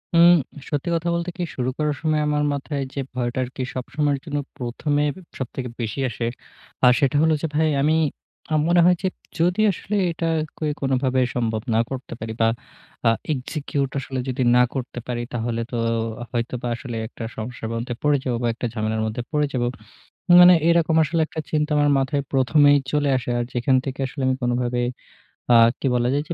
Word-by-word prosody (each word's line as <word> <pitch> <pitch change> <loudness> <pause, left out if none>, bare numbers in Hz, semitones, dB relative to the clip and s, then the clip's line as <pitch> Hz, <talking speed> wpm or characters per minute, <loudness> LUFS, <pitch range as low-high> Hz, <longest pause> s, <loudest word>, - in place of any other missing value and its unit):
উম 170 +1 +8 0.4
সত্যি 145 +3 -2
কথা 165 +1 -1
বলতে 170 +1 -2
কি 180 - -2
শুরু 125 0 -1
করার 150 -1 0
সময় 155 -1 +1
আমার 150 0 +1
মাথায় 140 0 -3
যে 140 - -4 0.2
ভয়টা 120 0 -2
আরকি 130 +1 -5
সবসময়ের 140 +2 -1
জন্য 145 -3 -3 0.2
প্রথমে 145 +4 -1 0.3
সবথেকে 130 0 -4
বেশি 115 +4 -3
আসে। 120 0 -4 0.6
আ - - +8
সেটা 140 0 +2
হল 160 0 +4
যে 165 - 0
ভাই 160 +1 +3
আমি, 155 +3 +3 0.6
আমার 155 -1 +3
মনে 175 0 +5
হয় 180 - +6
যে, 190 - +1 0.3
যদি 180 +5 +2
আসলে 200 +2 -4 0.2
এটা 165 0 -3 0.3
কে 155 - -3 0.2
কোনভাবে 130 -1 +1 0.2
সম্ভব 110 -3 -1
না - - +4
করতে 130 -1 -6
পারি 110 0 -5
বা 115 - +5 0.6
আ - - +7 0.2
execute 140 0 -3
আসলে 135 -1 -4
যদি 130 +1 -2
না 125 - +6
করতে 125 -2 -4
পারি, 120 -1 -2
তাহলে 115 -1 -2
তো - - -3 0.6
হয়তোবা 120 0 -3
আসলে 120 0 -7
একটা 115 - -9
সমস্যার 110 0 -5
মধ্যে 120 +2 -3
পড়ে 150 -1 +3
যাব 125 - -1
বা 120 - +2
একটা 120 - -5
ঝামেলার 110 0 -1
মধ্যে 110 +3 -3
পড়ে 150 -1 +2
যাব। 125 -2 0 0.8
মানে 180 0 +9
এরকম 170 -1 +3
আসলে 160 +3 -1
একটা 160 - -5
চিন্তা 150 0 0
আমার 145 0 +3
মাথায় 135 +1 0
প্রথমেই 145 +2 +5 0.2
চলে 145 -1 +2
আসে, 125 -1 -4
আর 120 - 0
যেখান 125 +2 +2
থেকে 135 0 -5
আসলে 135 +1 -6
আমি 130 - +2
কোনভাবে 120 0 0 0.7
আ - - +7 0.2
কি 135 - -1
বলা 120 0 +2
যায় 145 +1 0
যে - - -3
135 Hz, 185 wpm, -23 LUFS, 120-150 Hz, 0.8 s, মানে